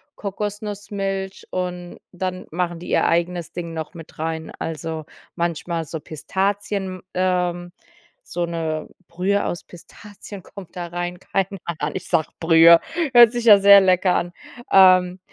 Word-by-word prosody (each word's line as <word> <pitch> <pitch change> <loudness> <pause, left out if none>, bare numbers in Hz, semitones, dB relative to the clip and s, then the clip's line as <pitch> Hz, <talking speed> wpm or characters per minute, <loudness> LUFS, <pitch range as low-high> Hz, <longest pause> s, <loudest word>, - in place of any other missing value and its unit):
Kokosnussmilch, 200 -1 -5
und 180 -1 -4
dann 185 0 -4
machen 175 0 -2
die 175 - -9
ihr - - +2
eigenes 170 0 -1
Ding 170 -1 -6
noch 160 +2 -6
mit 165 -2 -12
rein. 160 0 -4
Also 160 -1 -5 0.3
manchmal 170 -1 -2
so 160 +2 -6
Pistazien, 190 +4 -3
ähm, 180 -1 -1 0.5
so 175 0 -3
'ne 160 -2 -3 0.2
Brühe 190 +4 0
aus 175 - -4
Pistazien 200 +2 -13
kommt 195 -3 -12
da 175 -1 -4
rein. 175 +1 -4
Keine 195 +1 -2
Ahnung, 170 +1 -4
Ich 185 - -5
sage 165 -3 +1
Brühe. 165 0 +7 0.3
Hört 240 -2 +8
sich 240 -1 -4
ja 210 -3 +9
sehr 200 0 +8
lecker 185 -1 +3
an, 175 0 -2 0.4
ähm. 185 -1 +6
180 Hz, 140 wpm, -22 LUFS, 170-195 Hz, 0.5 s, ja